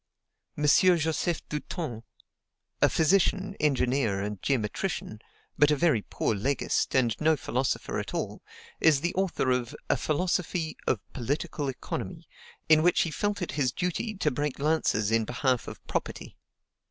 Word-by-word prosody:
M. 150 - -3
Joseph 165 +1 +3
Dutens 150 - -4 0.8
a - - +6
physician, 195 +3 +2
engineer, 130 -7 +1
and 105 -1 -4
geometrician, 120 - -2 0.4
but 145 - +6
a 150 - +4
very 150 -7 +2
poor 110 - -1
legist, 130 +8 0
and 120 -4 +3
no 155 0 +4
philosopher 130 0 -1
at - - -5
all - - -4 0.4
is 150 -4 +4
the 170 +1 -1
author 185 -8 0
of 125 -2 -1 0.2
a - - +3
"Philosophy 170 0 -1
of 115 - +2
Political 140 +3 -2
Economy," 130 - -5 0.4
in 155 -1 +6
which 175 +2 +4
he 165 - -3
felt 205 +2 -1
it - - -4
his 135 -4 0
duty 180 - -2
to 155 -6 0
break 145 +1 -2
lances 140 -8 +1
in 115 0 +3
behalf 125 +2 0
of - - -9
property. - - -4
150 Hz, 145 wpm, -28 LUFS, 125-170 Hz, 0.8 s, a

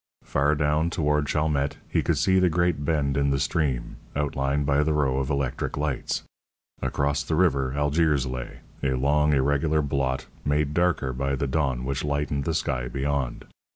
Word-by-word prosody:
Far 70 +2 +1
down 75 +2 +1
toward 75 -3 +1
Chalmette 75 -2 0
he - - +1
could - - 0
see 95 0 +3
the 90 -1 +4
great 85 -3 +1
bend 70 -3 0
in 70 0 +2
the 70 - +2
stream, 70 -2 -1 0.2
outlined 70 0 0
by 70 0 +3
the 75 +1 +1
row 70 -3 +1
of 65 - -2
electric 70 -2 -2
lights. 75 -3 -2 0.6
Across 70 0 0
the 80 - 0
river 70 -7 +2
Algiers 75 -1 +2
lay, 65 -1 -6 0.2
a 65 -1 +1
long, 75 +3 +2
irregular 70 +2 +2
blot, 65 -2 -1 0.2
made 75 0 +1
darker 85 -6 +1
by 70 +2 -1
the 70 - -1
dawn 65 -3 0
which 70 0 -2
lightened 70 -1 -1
the 80 - 0
sky 65 -6 -1
beyond. 70 -2 -2
70 Hz, 170 wpm, -25 LUFS, 70-75 Hz, 0.6 s, the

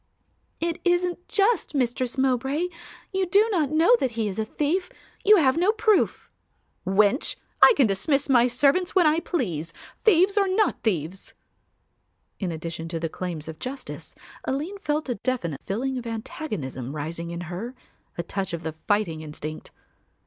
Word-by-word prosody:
"It 335 -1 -2
isn't 355 0 +1
just, 400 -6 +1
Mistress 250 -1 0
Mowbray. 270 +6 +1 0.4
You 380 -1 +1
do 405 +5 +5
not 320 -8 +1
know 325 - +5
that 255 -3 -1
he 220 -2 +1
is 195 +1 -4
a 220 - 0
thief; 320 - -1 0.3
you 425 +1 +7
have 275 -4 +3
no 365 +5 +4
proof." 435 -2 +1 0.6
"Wench, 205 +7 +3 0.3
I - - +9
can 270 - +6
dismiss 250 +8 +1
my 245 -3 +5
servants 285 +10 +2
when 365 -3 +5
I 310 +1 +4
please, 175 - -2 0.3
thieves 395 0 +5
or 395 - +3
not 405 +3 +1
thieves." 185 -3 -2 1.0
In 185 -4 -2
addition 165 0 -5
to 165 0 -3
the 165 0 -2
claims 165 -3 -5
of 160 -1 -8
justice 265 +2 -7 0.3
Aline 315 +10 -3
felt 305 -5 -1
a 250 - 0
definite 170 - -2
feeling 255 +6 -1
of 240 - -8
antagonism 165 - -5
rising 165 +3 -4
in 170 0 -5
her, 185 +9 -6 0.4
a 170 - -2
touch 195 -1 -4
of 170 0 -4
the 160 0 -3
fighting 205 -7 +1
instinct. 155 0 -7
255 Hz, 160 wpm, -25 LUFS, -, 1.0 s, I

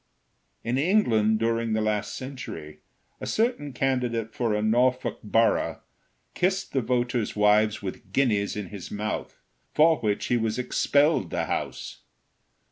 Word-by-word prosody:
In 120 +3 0
England, 115 - +3
during 115 0 0
the 110 - +1
last 105 -1 -1
century, 125 - -7 0.4
a - - -6
certain 220 - 0
candidate 125 -4 -1
for 115 -4 0
a 105 - 0
Norfolk 125 +3 +1
borough 115 +2 +2 0.5
kissed 190 +2 0
the 135 - +2
voters' 120 -1 -1
wives 105 0 +3
with 95 0 -7
guineas 105 -5 +1
in 105 -4 -5
his 100 -4 -8
mouth, 105 +1 -4 0.4
for 160 +1 +5
which 105 -3 -1
he 125 - +2
was 110 -1 -1
expelled 140 - +2
the - - -1
House. - - -4
115 Hz, 135 wpm, -26 LUFS, 105-130 Hz, 0.5 s, for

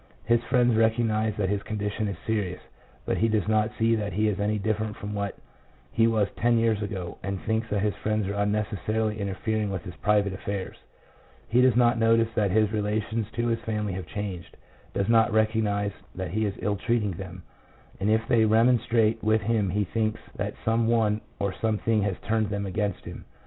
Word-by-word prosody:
His 120 0 +3
friends 120 0 +3
recog 110 +1 +3
nize 110 -1 0
that 95 -3 0
his 100 0 0
condition 105 0 -3
is 100 - -4
serious, 100 -5 -1 0.5
but - - 0
he 115 - +3
does 110 -3 0
not 110 0 +2
see 115 0 +3
that 105 -3 -1
he 105 +3 +2
is 105 -1 -1
any 105 +1 +1
different 110 0 -1
from 105 +1 -6
what 100 -1 -3 0.5
he 115 0 +3
was 110 -3 +2
ten 120 0 +3
years 115 -2 +2
ago, 95 -4 -5
and 100 -1 -3
thinks 110 +1 -1
that 105 -1 0
his 105 -1 +1
friends 110 -1 -1
are 100 - -2
unnecessarily 105 +1 -1
interfering 105 +2 -1
with 95 -4 -4
his 90 - -8
private 100 -2 +2
affairs. 100 0 -4 0.7
He 120 +2 +4
does 130 -2 +5
not 120 -1 +4
notice 115 0 +4
that 105 -3 +1
his 105 +2 +2
relations 110 +1 -1
to 120 0 -1
his 115 0 0
family 105 -3 -2
have 95 0 -5
changed, 100 -4 -6 0.3
does 100 - -1
not 115 -1 +4
recognize 110 -2 +1 0.2
that 95 -3 -4
he 110 +3 0
is 100 - -4
ill 105 -1 -1
treating 110 -1 0
them, 90 0 -8 0.6
and 100 +2 0
if 110 +1 +2
they 115 -3 +4
remonstrate 115 0 +3
with 110 0 +3
him 110 -2 +1
he 105 +3 +1
thinks 110 +3 -1 0.2
that - - -3
some 115 0 +2
one 110 -2 +2 0.2
or 100 -1 -1
something 110 +1 0
has 100 -2 -1
turned 110 -1 +1
them 100 -1 -2
against 100 0 -2
him. - - -8
110 Hz, 195 wpm, -26 LUFS, 100-110 Hz, 0.7 s, does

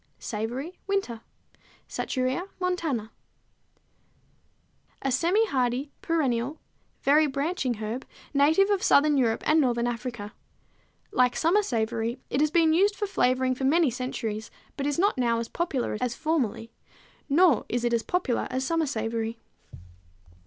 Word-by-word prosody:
=Savory, 245 +10 -5
Winter= 390 - -1 0.7
(Satureia 260 +7 -2
montana, 345 -9 -1
Linn.), 220 - -14 1.9
a 270 - 0
semi 345 - +3
hardy, 260 - -1
perennial, 275 -3 0 0.4
very 300 +2 +5
branching 280 -2 -1
herb, 220 +4 -4 0.3
native 315 +8 +4
of 400 -2 +1
southern 295 -3 +4
Europe 235 -4 +1
and 310 +1 +4
northern 240 -3 +1
Africa. 235 -3 -4 0.8
Like 250 -1 +3
summer 345 +6 +3
savory, 230 - -1
it 275 - +1
has 305 - +3
been 320 0 +4
used 400 +5 +3
for 415 - -2
flavoring 255 -8 +1
for 265 +1 -3
many 310 0 +3
centuries, 225 -3 -4 0.3
but 280 0 -2
is 290 - -1
not 390 -5 +2
now 235 -2 +2
as 230 0 -3
popular 300 -11 -2
as 245 -1 -1
formerly, 255 -8 -1 0.6
nor 315 - +4
is 240 0 -1
it 240 0 +1
as 230 - +2
popular 305 -5 -1
as 260 +1 -2
summer 330 +1 +1
savory. 225 -2 -2
265 Hz, 140 wpm, -27 LUFS, 235-325 Hz, 1.9 s, very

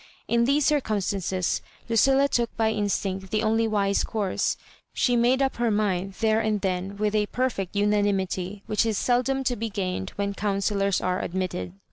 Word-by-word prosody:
In 235 0 +3
these 280 +2 +2
circum 265 -9 +1
stances 190 -2 -1 0.3
Lucilla 270 +5 +4
took 240 -4 -1
by 220 -1 +2
instmct 195 -2 -2
the 215 +3 0
only 225 +1 +2
wise 200 -2 +1
course: 205 -4 -1 0.4
she 245 - +2
made 245 +3 +3
up 270 - -1
her 240 -1 +1
mind 195 -3 0
there 220 -1 +3
and 215 -2 0
then 190 +1 -2
with 210 0 0
a 210 -1 +2
perfect 230 -8 -2
unanimity 200 -2 0
which 210 0 +1
is 220 -3 0
seldom 255 +3 +1
to 250 -1 0
be 225 +1 -3
gained 190 -1 -3
when 200 0 -2
counsellors 200 -1 0
are 185 0 0
admitted. 175 - -3
210 Hz, 170 wpm, -25 LUFS, 195-230 Hz, 0.4 s, Lucilla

